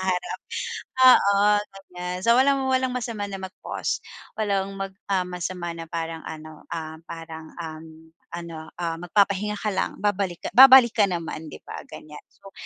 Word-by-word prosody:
haharap. 185 Hz, -1 st, -1 dB, 0.7 s
Oo, 200 Hz, -6 st, +7 dB, 0.4 s
ganiyan. 180 Hz, -2 st, -7 dB
So 235 Hz, -, +6 dB
walang 275 Hz, 0 st, +3 dB
walang 260 Hz, -1 st, +1 dB
masama 225 Hz, -4 st, -4 dB
na 195 Hz, -, -5 dB
mag-pause. 190 Hz, +1 st, -4 dB, 0.3 s
Walang 200 Hz, -2 st, -1 dB
mag, 195 Hz, -1 st, -5 dB, 0.2 s
ah, 185 Hz, -1 st, +2 dB
masama 180 Hz, -1 st, -4 dB
na 165 Hz, -, -6 dB
parang 165 Hz, 0 st, -5 dB
ano, 155 Hz, -1 st, -9 dB
ah, 160 Hz, -1 st, -5 dB
parang, 160 Hz, -1 st, -9 dB
um, 160 Hz, -1 st, -7 dB, 0.4 s
ano, 165 Hz, -2 st, -8 dB
ah, 165 Hz, -1 st, -3 dB
magpapahinga 200 Hz, +3 st, +1 dB
ka 210 Hz, 0 st, -2 dB
lang, -, -, -2 dB
babalik 200 Hz, -3 st, 0 dB
ka -, -, -1 dB
babalik 260 Hz, -2 st, +9 dB
ka 205 Hz, -3 st, +3 dB
naman, 165 Hz, -3 st, -4 dB
'di -, -, -11 dB
ba -, -, -7 dB
ganiyan. 150 Hz, -1 st, -11 dB
So, 195 Hz, -1 st, -16 dB
185 Hz, 155 wpm, -24 LUFS, 165-205 Hz, 0.7 s, babalik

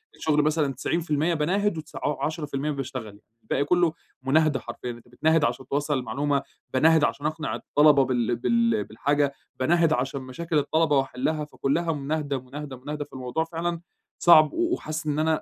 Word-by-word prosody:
الشغل 150 Hz, -1 st, +1 dB
مثلًا 150 Hz, -2 st, +1 dB
90% 155 Hz, +3 st, 0 dB
باناهد 180 Hz, +5 st, 0 dB
وتس 155 Hz, 0 st, -9 dB
ع 145 Hz, -, -2 dB
عشرة 155 Hz, 0 st, -3 dB
في 145 Hz, -, -18 dB
المِيّة 145 Hz, +3 st, -1 dB
باشتغل، 130 Hz, -7 st, -6 dB, 0.2 s
الباقي 140 Hz, -, 0 dB
كله 175 Hz, 0 st, +3 dB, 0.3 s
مناهدة 150 Hz, 0 st, +3 dB
حرفيًا، 120 Hz, +1 st, -6 dB
أنت 120 Hz, 0 st, -13 dB
بتناهِد 155 Hz, +5 st, +2 dB
عشان 130 Hz, -2 st, -1 dB
توصَّل 145 Hz, +2 st, -1 dB
المعلومة، 140 Hz, +2 st, -1 dB, 0.3 s
باناهِد 160 Hz, +3 st, +5 dB
عشان 145 Hz, 0 st, 0 dB
أقنع 155 Hz, 0 st, -2 dB
الطلبة 145 Hz, -2 st, +4 dB
بال 120 Hz, -2 st, 0 dB
بال 230 Hz, -, +1 dB
بالحاجة، 140 Hz, +4 st, 0 dB, 0.3 s
باناهِد 165 Hz, +3 st, +3 dB
عشان 135 Hz, +2 st, -2 dB
مشاكل 155 Hz, +5 st, -3 dB
الطلبة 150 Hz, +1 st, +2 dB
وأحلها، 135 Hz, +3 st, -1 dB
فكلها 155 Hz, +3 st, -1 dB
مناهِدة، 145 Hz, -1 st, -2 dB
مناهِدة، 135 Hz, +1 st, -8 dB
مناهِدة 145 Hz, +3 st, -5 dB
فالموضوع 130 Hz, +4 st, -3 dB
فعلًا 170 Hz, +1 st, -3 dB, 0.4 s
صعب 155 Hz, -3 st, +7 dB
و 345 Hz, +1 st, 0 dB
وحاسس 155 Hz, -, -4 dB
إن 150 Hz, 0 st, 0 dB
أنا 160 Hz, 0 st, +1 dB
150 Hz, 165 wpm, -25 LUFS, 135-160 Hz, 0.4 s, صعب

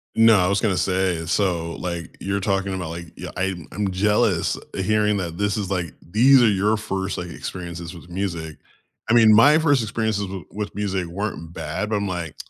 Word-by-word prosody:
No, 115 Hz, -1 st, +6 dB
I 90 Hz, -, +3 dB
was 100 Hz, +1 st, +1 dB
gonna 100 Hz, -5 st, +1 dB
say, 90 Hz, -3 st, 0 dB
so, 85 Hz, -2 st, 0 dB
like, 85 Hz, -2 st, -5 dB
you're 100 Hz, +1 st, -1 dB
talking 95 Hz, 0 st, -1 dB
about, 90 Hz, -3 st, -4 dB
like, 85 Hz, +1 st, -7 dB
y -, -, -6 dB
I 95 Hz, +1 st, 0 dB, 0.2 s
I'm 100 Hz, -2 st, -2 dB
jealous 105 Hz, +3 st, +1 dB, 0.2 s
hearing 105 Hz, +1 st, +1 dB
that 85 Hz, -3 st, -4 dB
this 105 Hz, +1 st, 0 dB
is, 100 Hz, -3 st, -3 dB
like 90 Hz, -6 st, -2 dB, 0.2 s
these 125 Hz, +7 st, +6 dB
are 120 Hz, -, +6 dB
your 105 Hz, +2 st, +2 dB
first, 95 Hz, -2 st, -3 dB
like, 90 Hz, -, -4 dB
experiences 85 Hz, 0 st, -7 dB
with 85 Hz, 0 st, -13 dB
music. 85 Hz, -4 st, -4 dB, 0.5 s
I -, -, +4 dB
mean, 110 Hz, -2 st, +7 dB
my 145 Hz, +7 st, +7 dB
first 145 Hz, -6 st, +3 dB
experiences 110 Hz, -1 st, -1 dB
w 95 Hz, -2 st, -6 dB
with 105 Hz, -1 st, -5 dB
music 100 Hz, -3 st, -1 dB
weren't 85 Hz, -2 st, -5 dB
bad, 80 Hz, +7 st, -4 dB
but 110 Hz, -, 0 dB
I'm 100 Hz, 0 st, -2 dB
like, 85 Hz, -4 st, -4 dB
95 Hz, 195 wpm, -22 LUFS, 90-105 Hz, 0.5 s, mean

